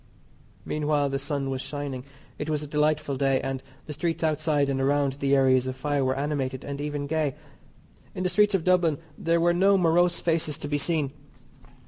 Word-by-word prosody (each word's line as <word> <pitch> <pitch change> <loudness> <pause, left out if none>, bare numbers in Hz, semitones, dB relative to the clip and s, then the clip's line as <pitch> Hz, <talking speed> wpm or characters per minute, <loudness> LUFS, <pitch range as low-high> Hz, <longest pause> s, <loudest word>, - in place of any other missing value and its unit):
Meanwhile 150 -1 0
the 135 0 -2
sun 135 -1 -2
was 130 -1 -3
shining. 140 -3 -5 0.4
It 150 - -3
was 150 -1 -1
a - - -6
delightful 150 -1 0
day, 135 -1 +2
and 135 -1 -3 0.2
the 150 - -6
streets 165 +3 -2
outside 155 -2 +1
and 135 -1 -1
around 140 0 +2
the 140 0 +1
areas 130 -1 +3
of 130 - -3
fire 145 +1 -1
were 130 0 0
animated 135 -3 -2
and 140 0 -5
even 145 -1 -3
gay. 150 -2 -1 0.8
In 185 - -3
the 180 - +1
streets 205 +2 +3
of 180 - 0
Dublin 175 -4 +3 0.2
there 165 +2 +1
were 175 +1 +3
no 195 +3 +4
morose 175 0 +3
faces 160 -3 0
to - - -6
be 145 0 0
seen. 150 -3 0
145 Hz, 190 wpm, -26 LUFS, 135-160 Hz, 0.8 s, no